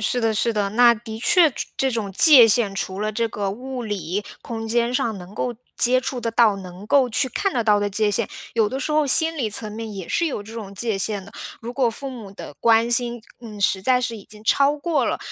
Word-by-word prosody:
是 245 +3 0
的 225 -1 +1
是 230 +2 0
的。 205 -2 -1
那 235 +2 +5
的 220 -1 -9
确 350 - +4
着 - - -22 0.2
这 270 - +1
种 220 -5 -3
界 265 - +8
限 210 -3 +2
除 190 0 -4
了 215 0 -1
这 230 +2 -1
个 205 -2 -3
物 255 +4 -6
理 205 -2 -4 0.2
空 225 -1 -6
间 235 +2 0
上 225 -4 -1
能 185 +3 -12
够 245 -2 -3 0.2
接 255 +1 +4
触 255 -1 -4
得 230 - -2
到、 225 -3 +3
能 185 +1 -10
够 265 0 +3
去 245 - 0
看 395 +7 -1
得 235 - 0
到 210 -2 +3
的 205 - 0
界 210 +1 +1
限， 210 +1 0 0.2
有 220 -2 +2
的 260 - -4
时 300 - -3
候 305 -1 +2
心 320 +4 +3
理 230 -6 -1
层 210 0 -1
面 225 0 -6
也 190 -4 -7
是 340 - 0
有 270 -9 -4
这 215 +2 -12
种 210 -4 -8
界 220 0 -2
限 200 -1 -2
的。 200 - -15 0.3
如 235 +1 -7
果 255 -2 +1
父 270 +4 -7
母 225 -6 -9
的 195 - -10
关 230 0 +3
心， 240 0 0 0.2
嗯， 220 -3 -10
实 195 -1 +2
在 250 +4 +3
是 240 -2 -3
已 200 - -14
经 210 0 -15
超 280 +5 +3
过 320 +2 0
了 - - -1
225 Hz, 265 characters per minute, -22 LUFS, 205-250 Hz, 0.3 s, 界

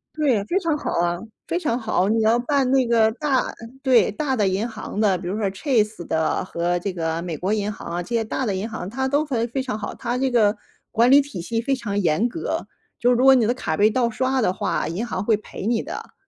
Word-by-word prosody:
对， 265 -10 +2
非 355 - 0
常 330 -4 0
好 - - -4
啊， 175 0 0 0.3
非 345 - -1
常 240 -8 0
好。 220 -5 0
你 225 +2 +2
要 220 +2 +4
办 265 +1 +1
那 265 -1 +4
个 225 -2 +3
大 270 0 0 0.3
对， 250 -7 +4
大 265 +4 -1
的 210 -5 +2
银 195 +5 0
行 215 -2 -6
的， 200 -4 +3
比 175 - -7
如 185 - -2
说 200 - +1
Chase 215 - 0
的 160 +3 0
和 175 0 -1
这 185 +2 -3
个 165 -1 -2
美 170 -3 -4
国 185 +6 -2
银 210 -1 0
行 - - -10
啊， 175 - -2
这 - - -14
些 225 - +2
大 250 +4 -2
的 200 - 0
银 200 +4 -3
行， 220 -5 -5
它 265 +5 -2
都 285 +3 +1
会 240 -5 -1
非 265 +3 -2
常 255 -5 -3
好。 210 - -5
它 245 0 -3
这 265 +1 +1
个 220 -4 +3 0.4
管 235 +2 +4
理 280 - +8
体 275 -11 -3
系 225 +6 -2
非 270 +4 0
常 220 -6 -4
严 190 +5 +2
格， 325 +7 -3 0.4
就 245 - +3
是 245 - +4
说 - - 0
如 260 - +3
果 270 - +9
你 240 -5 +3
的 240 - +1
卡 160 -10 -2
被 210 +5 +4
盗 240 +1 +1
刷 260 +3 0
的 215 -6 +2
话， - - -1
银 180 +8 -3
行 195 -5 -3
会 225 - +4
赔 210 - -9
你 230 0 +1
的。 - - -8
225 Hz, 290 characters per minute, -23 LUFS, 195-260 Hz, 0.4 s, 果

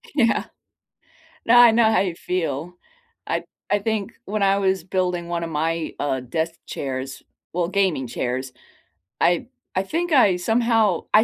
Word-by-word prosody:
Yeah. 235 -5 +2 1.0
No, 240 +1 +6
I 240 -2 +9
know 220 -1 +4
how 220 - +3
you 180 -4 -2
feel. 170 -2 -3 0.5
I - - -1 0.3
I 205 - +2
think 215 -1 -2
when 210 0 -1
I 195 0 +4
was 190 -3 +1
building 180 -2 -1
one 170 -1 -2
of 165 - -4
my, 160 +1 -1
uh, 135 -2 0
desk 160 +6 -3
chairs 135 -1 -5 0.3
well, 175 -1 0
gaming 185 -9 0
chairs, 130 +2 -3 0.7
I 175 +5 +2 0.3
I 190 - +1
think 335 - -2
I 210 -10 +5
somehow 225 -2 +2
I 215 - +7
180 Hz, 155 wpm, -23 LUFS, 160-215 Hz, 1.0 s, I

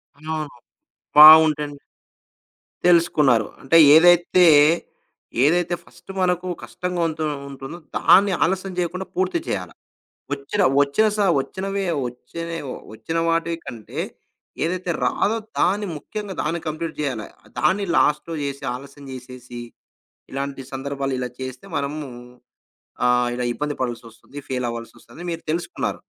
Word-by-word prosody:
ఆ! 155 +2 -5 0.8
బావుంటండి. 150 -2 +8 1.1
తెలుసుకున్నారు. 150 -10 +4
అంటే 165 +5 +4 0.2
ఏదైతే, 175 +1 +6 1.0
ఏదైతే 175 +2 +2
ఫస్టు - - -14
మనకు 180 0 0 0.2
కష్టంగా 180 -1 -4
ఉంటు 155 0 -4 0.3
ఉంటుందో 135 +4 -8 0.2
దాన్ని 195 0 +5
ఆలస్యం 190 +2 -1
జేయకుండా 180 +2 -3
పూర్తి 370 -2 0
చేయాలా. - - -3 0.6
ఒచ్చిన 145 +9 -2 0.2
ఒచ్చిన 145 +10 +2
సా 205 -1 +2 0.2
ఒచ్చినవే 195 +4 -4 0.2
ఒచ్చిన 165 +7 -8 0.4
ఒచ్చిన 165 +9 -4
వాటి 165 0 0
కంటే, 110 -3 -8 0.6
ఏదైతే 180 +1 -2
రాదో 225 +2 +1 0.2
దాన్ని 205 +3 +2
ముఖ్యంగా 205 +4 -6
దాన్ని 165 +3 -1
కంప్లీట్ 160 +2 -4
జేయాల. 130 -8 -2 0.4
దాన్ని 200 +1 +2
లాస్ట్‌లో 150 +3 +1
జేసి 140 0 -5
ఆలస్యం 140 +2 -11
జేసేసి 125 -1 -9 0.7
ఇలాంటి 135 0 -4
సందర్భాలు 135 0 -3
ఇలా 125 -1 -3
చేస్తే 130 -1 -7
మనము-ఆహ్, 130 -4 -7 0.7
ఇలా 125 0 -2
ఇబ్బంది 150 0 -3
పడాల్సొస్తది. 120 +2 -6
ఫెయిలవ్వాల్సొస్తది 120 +5 -6
మీరు 165 0 -5
తెలుసుకున్నారు. 170 - -3
155 Hz, 110 wpm, -22 LUFS, 135-175 Hz, 1.1 s, బావుంటండి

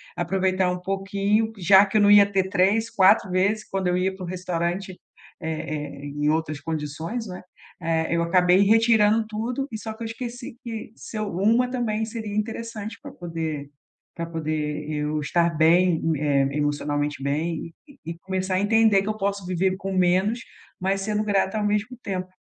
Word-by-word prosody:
aproveitar 185 +1 +1
um 180 - -2
pouquinho 200 +3 0
já 195 +2 +6
que 195 - -8
eu - - +4
não 205 0 +6
ia 205 -1 +8
ter 190 -1 0
3, 205 +5 +2
4 190 -1 +4
vezes 200 +4 +1
quando 190 -1 -1
eu 180 - +2
ia 190 +1 0
para 190 - -8
o - - -7
restaurante, 180 +1 -3 0.4
eh 155 -3 -4
eh, - - -6
em 145 +1 -2
outras 155 -1 -1
condições, 160 - -4
né, 180 -1 -7 0.4
eh, 160 0 0
eu 170 - +1
acabei 180 +2 +4
retirando 220 0 +4
tudo, 235 +5 -3
e 220 - -4
só 220 0 -6
que 225 - -8
eu - - -3
esqueci 235 +1 -7
que 225 -3 -6
se 220 - -8
eu, 215 -1 -2
uma 230 +7 +2
também 225 -4 -1
seria 220 -2 -6
interessante 220 0 -4
pra - - -9
poder 160 -4 -5 0.5
pra 170 - -3
poder 155 -2 -3
eu 150 0 -1
estar 170 +3 +2
bem, 170 +1 +4 0.2
eh, 140 -2 +2
emocionalmente 145 -1 -1
bem 160 +3 -2
e 285 - -18
e 165 +1 -5
começar 190 0 -2
a 185 - +2
entender 220 -1 +4
que 200 - -7
eu 215 - -1
posso 200 -2 -2
viver 185 +1 0
com 195 0 -4
menos, 185 +5 +2 0.4
mas 195 +1 0
sendo 210 +1 -1
grata 200 0 +1
ao - - -1
mesmo 210 +4 -1
tempo. 185 -2 -3
190 Hz, 180 wpm, -24 LUFS, 165-215 Hz, 0.5 s, ia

